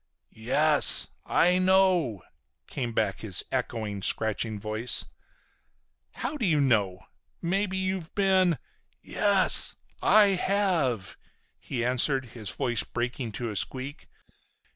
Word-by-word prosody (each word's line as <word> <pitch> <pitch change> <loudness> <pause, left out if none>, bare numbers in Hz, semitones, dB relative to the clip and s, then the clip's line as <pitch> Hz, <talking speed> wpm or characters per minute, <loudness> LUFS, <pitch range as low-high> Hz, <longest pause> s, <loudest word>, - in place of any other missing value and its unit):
"Yes, 115 - +4 0.2
I 180 +2 +3
know!" 185 - +2 0.4
came 120 -4 -4
back 105 -3 -1
his 100 -5 +1
echoing, 110 -6 -3
scratching 110 +1 -1
voice. 110 +3 -2 1.1
"How 275 +6 -4
do 240 - -1
you 155 -4 +2
know? 105 -9 +1 0.4
Maybe 190 +2 -1
you've 190 -3 -4
been—?" 190 -4 +2 0.5
"Yes, - - +1 0.3
I 210 -1 +5
have!" 175 - 0 0.4
he 120 -3 -4
answered, 130 +2 +1
his 110 -5 -2
voice 120 -2 0
breaking 120 -1 -4
to 120 0 -4
a - - -7
squeak. 130 +7 -4
130 Hz, 110 wpm, -27 LUFS, 110-185 Hz, 1.1 s, I